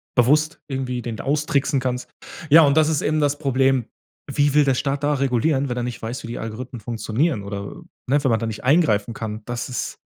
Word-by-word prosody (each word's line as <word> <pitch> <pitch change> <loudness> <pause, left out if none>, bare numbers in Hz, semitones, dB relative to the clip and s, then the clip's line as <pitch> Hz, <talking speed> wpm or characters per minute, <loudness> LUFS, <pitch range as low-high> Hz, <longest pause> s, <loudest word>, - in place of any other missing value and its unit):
bewusst 150 +6 +3
irgendwie 130 -2 -3
den 115 -2 -5
austricksen 145 -1 0
kannst. 125 -1 -3 0.4
Ja, 165 +3 +9
und 140 0 +3
das 155 0 +4
ist 155 -3 0
eben 155 +1 +1
das 145 -1 +1
Problem. 135 -3 +1 0.5
Wie 145 -1 +2
will 150 0 +5
der 135 -2 +2
Staat 140 +2 -2
da 145 0 +2
regulieren, 135 +1 +1
wenn 125 - -3
er 120 - -1
nicht 120 -2 -5
weiß, 115 +4 -5
wie - - -6
die 120 - -5
Algorithmen 120 +2 -6
funktionieren 115 +3 -1
oder, 100 0 -6 0.3
ne, 140 +2 +2
wenn 130 - +2
man 110 - +2
da 115 - -2
nicht 110 -2 -5
eingreifen 125 -7 +2
kann? 110 -1 -5
Das 120 -1 -4
ist 125 - -4
130 Hz, 215 wpm, -22 LUFS, 115-145 Hz, 0.5 s, Ja